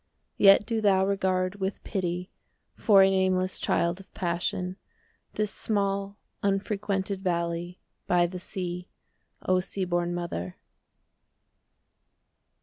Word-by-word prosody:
Yet 195 +1 +7
do 225 -2 -1
thou 190 -2 +4
regard, 190 -1 0
with 195 0 -3
pity 180 -2 -3 0.4
5 - - -22
For 200 -3 +7
a 190 - +5
nameless 185 -1 +1
child 170 +2 +1
of 195 - -15
passion, 180 +1 -2 0.6
This 210 -1 -1
small 200 -1 -1 0.2
unfrequented 195 -1 -1
valley 170 -1 -2 0.3
By 175 -1 +4
the 180 +1 -5
sea, 180 -2 -5 0.5
O 185 0 +3
sea 190 +1 -3
born 175 0 0
mother. 90 - -4
190 Hz, 115 wpm, -27 LUFS, 175-195 Hz, 0.6 s, Yet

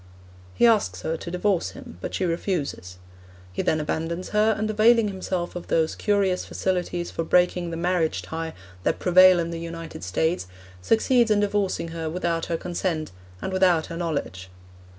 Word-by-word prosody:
He - - +4
asks 210 - +2
her 160 - -1
to 170 - -7
divorce 180 - 0
him, 85 - -11
but - - -4
she 190 - 0
refuses. 165 - -3 0.6
He - - -1
then 155 - +1
abandons 165 +4 -3
her, 215 +1 +3
and 215 0 -1
availing 215 +1 +4
himself 185 -2 -3
of 175 - -6
those 160 -1 +1
curious 200 -3 +1
facilities 175 -2 -2
for 165 - -2
breaking 180 +1 +2
the 165 - -4
marriage 175 -2 0
tie 160 0 -5 0.3
that - - 0
prevail 185 0 +6
in 170 0 -2
the 165 - -4
United 165 -4 -7
States, 160 - 0 0.3
succeeds 235 - +3
in 210 -1 +3
divorcing 200 -4 0
her 165 -1 -4
without 170 -1 -1
her 170 - -1
consent, 175 - -3 0.3
and 190 - -3
without 180 -4 +3
her - - -5
knowledge. 140 - -3
175 Hz, 170 wpm, -25 LUFS, 165-190 Hz, 0.6 s, prevail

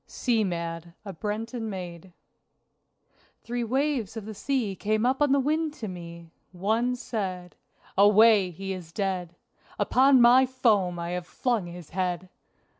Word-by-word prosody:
SEA 235 -4 0
MAD 170 -2 -4
(A 195 - -6
Breton 220 +5 -4
Maid) 180 -2 -7 1.3
Three 240 0 -3
waves 255 -3 -1
of 215 - -6
the 220 - -6
sea 220 -2 -1
came 215 +3 0
up 265 +3 +1
on 290 -2 +4
the 280 - +4
wind 305 +2 0
to 220 - -6
me! 170 -2 -9 0.2
One 220 +7 0
said: 185 -7 -5 0.4
"Away! 205 -1 +6
he 195 +3 -5
is 175 -3 -9
dead! 180 -2 -3 0.4
Upon 265 +1 +4
my 245 +2 +6
foam 215 -9 +1
I 170 0 -4
have 180 -1 -4
flung 235 -8 -1
his 175 -2 -10
head! 180 0 -2
205 Hz, 145 wpm, -27 LUFS, 180-240 Hz, 1.3 s, Away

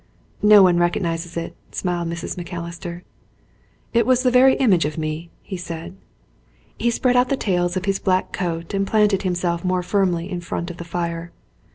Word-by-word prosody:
"No 210 -1 +8
one 175 -2 +4
recognises 170 -1 -1
it," 165 - -4 0.2
smiled 175 -2 -2
Mrs. 170 0 -4
Macalister. 170 0 -6 0.9
"It 235 +1 +3
was 255 0 +3
the 250 - +3
very 260 +2 +6
image 200 -11 +3
of 150 +1 -3
me," 155 +2 -4
he 190 - -6
said. 170 0 -7 0.8
He 240 - 0
spread 250 +2 +1
out 250 0 +4
the 275 - +1
tails 180 -4 0
of 185 - -3
his 195 -1 0
black 185 -1 +1
coat 170 -2 -3
and 195 0 0
planted 210 -3 +3
himself 175 -2 -1
more 180 -1 0
firmly 180 -3 0
in 180 -1 -3
front 175 0 -4
of 175 - -11
the 170 - -7
fire. 170 0 -3
180 Hz, 180 wpm, -22 LUFS, 170-195 Hz, 0.9 s, No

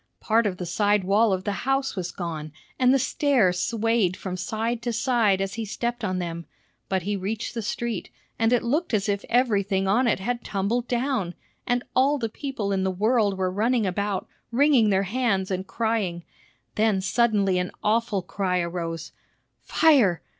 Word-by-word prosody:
Part 225 0 +2
of 185 -2 -3
the 180 - -4
side 205 +3 +2
wall 205 +4 +3
of 185 -1 -1
the 205 - -1
house 270 -1 0
was 180 -3 -3
gone, 160 -4 -5 0.3
and 255 -1 +5
the 270 - +5
stairs 245 -9 +2
swayed 225 -4 +1
from 185 -2 -5
side 225 +5 -2
to 240 0 -2
side 230 -5 +2
as 195 0 -2
he 225 - -3
stepped 235 +3 -3
on 185 -3 -1
them; 170 -2 -4 0.4
but 190 -2 0
he 205 +2 -1
reached 210 +5 -3
the 230 - -3
street, 225 0 -3 0.3
and 225 0 +3
it 245 - +3
looked 280 +2 0
as 205 0 0
if 200 0 -1
everything 200 -6 +2
on 240 +6 +3
it 230 - +2
had 240 +4 -3
tumbled 215 +5 -1
down, 240 -8 -1 0.3
and 245 0 +1
all 275 +3 +4
the 230 -4 -2
people 225 -4 -4
in 190 -1 0
the 190 - +1
world 205 +1 +1
were 185 -1 0
running 225 +3 +1
about, 195 +1 -2 0.2
wringing 260 -3 +4
their 195 -1 +2
hands, 200 -3 0
and 190 0 -3
crying. 220 -7 -1 0.5
Then 215 -2 +2
suddenly 200 -2 +2
an 180 0 -2
awful 215 -3 +1
cry 185 0 -1
arose, 170 -2 -4 0.5
"Fire! 255 - +3
210 Hz, 180 wpm, -25 LUFS, 190-235 Hz, 0.5 s, and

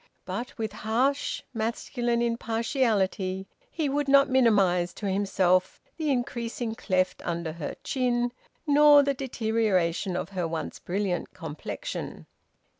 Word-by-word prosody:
But 245 +1 -5
with 220 -2 -2
harsh 245 +7 0
masculine 235 +1 -1
impartiality 225 -5 0 0.2
he 315 -8 -1
would 285 +1 0
not 275 0 +5
minimise 195 -9 +3
to 210 - -6
himself 190 -2 +1 0.2
the 310 -2 -1
increasing 240 -3 -2
cleft 185 -4 0
under 170 -1 -2
her 160 -2 -5
chin, 245 -2 0 0.3
nor 295 -1 +7
the 280 0 +1
deterioration 220 -8 0
of 180 - -3
her 180 -4 -2
once 165 0 -4
brilliant 185 -1 -2
complexion. 165 - -6
225 Hz, 115 wpm, -27 LUFS, 185-255 Hz, 0.3 s, nor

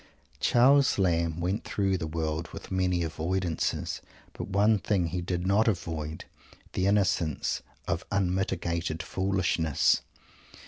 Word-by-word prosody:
Charles 135 +3 +5
Lamb 85 -3 +1
went 95 +5 -1
through 95 -2 0
the 80 - -3
world 80 +1 -2
with - - -9
many 90 -2 +1
avoidances, 85 +2 -2 0.3
but - - -6
one 105 +2 +3
thing 95 -3 +1
he 90 +2 -2
did 90 0 -2
not 100 +4 +3
avoid 80 -6 -2 0.5
the 95 - +1
innocence 95 -6 +1 0.3
of - - -1
unmitigated 85 -4 -1
foolishness! 85 -6 +1
90 Hz, 120 wpm, -28 LUFS, 80-95 Hz, 0.5 s, Charles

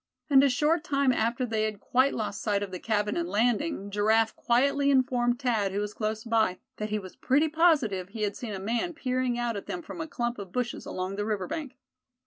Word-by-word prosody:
And 270 -1 +7
a 280 - +5
short 300 +5 +2
time 275 -2 +2
after 235 +3 0
they 220 -2 0
had 215 -2 -4
quite 260 +6 +2
lost 200 -3 -3
sight 205 -2 0
of 195 - -6
the 185 - -5
cabin 210 0 0
and 170 0 -2
landing, 220 - 0
Giraffe 220 +2 +2
quietly 280 +4 +2
informed 250 -3 +2
Thad, 225 -7 +1
who 200 - 0
was 210 0 -3
close 215 0 -3
by, 220 -5 +1 0.2
that 215 0 -3
he 215 - 0
was 190 -3 -8
pretty 290 +5 +2
positive 290 - +2
he 215 +1 -4
had 205 -1 -1
seen 220 -5 -5
a - - -5
man 235 - -2
peering 255 -4 -1
out 240 -1 -1
at 200 - -6
them 350 - -4
from 315 - -7
a 315 - -4
clump 240 -5 -3
of 195 -3 -8
bushes 245 +2 -3
along 185 +2 -4
the 205 - -1
river 205 -4 -1
bank. 275 - -5
230 Hz, 225 wpm, -28 LUFS, 205-260 Hz, 0.2 s, And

